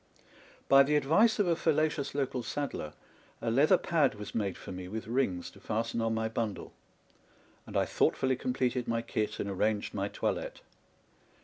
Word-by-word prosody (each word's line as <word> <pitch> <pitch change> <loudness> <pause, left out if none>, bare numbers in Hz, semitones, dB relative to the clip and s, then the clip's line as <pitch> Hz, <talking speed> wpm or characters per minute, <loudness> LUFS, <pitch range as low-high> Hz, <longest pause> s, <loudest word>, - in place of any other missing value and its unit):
By 135 0 +8
the 145 +2 +3
advice 160 - +4
of 205 - +3
a 170 -1 +2
fallacious 155 -3 0
local 130 -3 -1
sad 145 +4 -3
dler, 75 0 -6 0.5
a 115 - -1
leather 150 +10 +5
pad 155 -10 +2
was 105 -1 -8
made 100 -5 -1
for - - -9
me 90 -1 -6
with 110 +4 -5
rings 110 -7 -1
to - - -16
fasten 115 +1 -2
on 115 0 0
my 110 0 0
bundle; 110 -2 -4 0.9
and - - -3
I - - +3
thoughtfully 130 0 +1
completed 125 -1 -1
my 115 0 0
kit 110 -2 -2
and - - -2
ar 100 - -3
ranged 105 +2 0
my 100 -1 -1
toilette. - - -3
120 Hz, 180 wpm, -31 LUFS, 105-140 Hz, 0.9 s, By